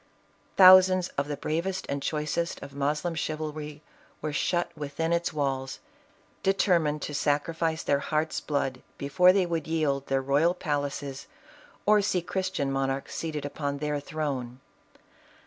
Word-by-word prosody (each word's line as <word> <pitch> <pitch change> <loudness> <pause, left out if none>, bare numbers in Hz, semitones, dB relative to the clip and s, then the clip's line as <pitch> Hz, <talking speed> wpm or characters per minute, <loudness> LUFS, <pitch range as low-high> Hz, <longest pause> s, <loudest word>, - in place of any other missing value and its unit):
Thousands 185 -1 +8
of 140 +1 -3
the 145 -1 -3
bravest 175 +5 -2
and 140 0 -3
choicest 155 +3 -2
of 140 -1 -9
Mos 145 +2 -1
Yivulry 155 -3 -4 0.4
were 155 -1 -4
shut 175 +3 0
within 150 +3 -2
its 170 0 0
walls, 135 -3 -2 0.6
determined 170 -6 +2
to 150 - -4
Kicrifice 160 +3 0
tht - - -10
ir 140 - +4
heart's 155 +2 -1
blood, 135 -3 -2 0.2
before 160 +6 +4
they 190 -1 +2
would 165 -3 -2
yield 150 -4 0
their 135 0 +1
royal 145 +6 +2
palaces, 145 -4 -3 0.6
or 210 0 +5
see 185 -3 0
Christian 175 -7 -2
monarchs 135 0 -2
seated 155 -3 -4
upon 145 0 -3
their 150 0 -2
throne. 140 -5 -4
150 Hz, 140 wpm, -27 LUFS, 140-170 Hz, 0.6 s, Thousands